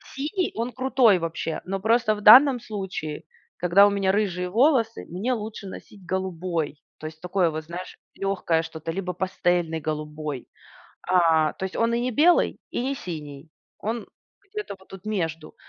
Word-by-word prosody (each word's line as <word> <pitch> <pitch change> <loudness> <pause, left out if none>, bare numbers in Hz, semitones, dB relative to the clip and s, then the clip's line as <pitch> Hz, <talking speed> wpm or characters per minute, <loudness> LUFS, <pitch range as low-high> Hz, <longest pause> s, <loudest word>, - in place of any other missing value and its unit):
Синий- 325 +7 -1
он 230 +2 -2
крутой 255 -5 +4
вообще. 165 -1 -3
Но 195 +1 -3
просто 220 +2 +3
в 210 - -8
данном 250 +5 +9
случае, 190 -9 -5 0.3
когда 180 +3 +6
у - - +3
меня 200 -1 +1
рыжие 185 -3 -1
волосы, 230 - +2
мне 195 +9 -2
лучше 215 -2 -6
носить 190 0 -11
голубой. 175 -4 -3 0.2
То 155 - -6
есть 155 0 -11
такое 180 -1 +1
вот, 155 0 -5
знаешь, 175 +3 -8 0.2
легкое 185 -4 0
что-то, 160 0 -6
либо 180 +1 -3
пастельный 175 -2 0
голубой. 150 -2 -4 0.6
А, 165 -4 +3
то 190 - -8
есть 190 - -6
он 230 0 +2
и 235 - +1
не 250 +1 -1
белый, 335 +8 +3
и - - -2
не 275 +2 -1
синий, 155 - -8 0.3
он 225 +1 -3 0.4
где-то 425 - -5
вот 190 - -21
тут 190 0 -11
между. 165 -7 -3
190 Hz, 165 wpm, -25 LUFS, 165-225 Hz, 0.6 s, данном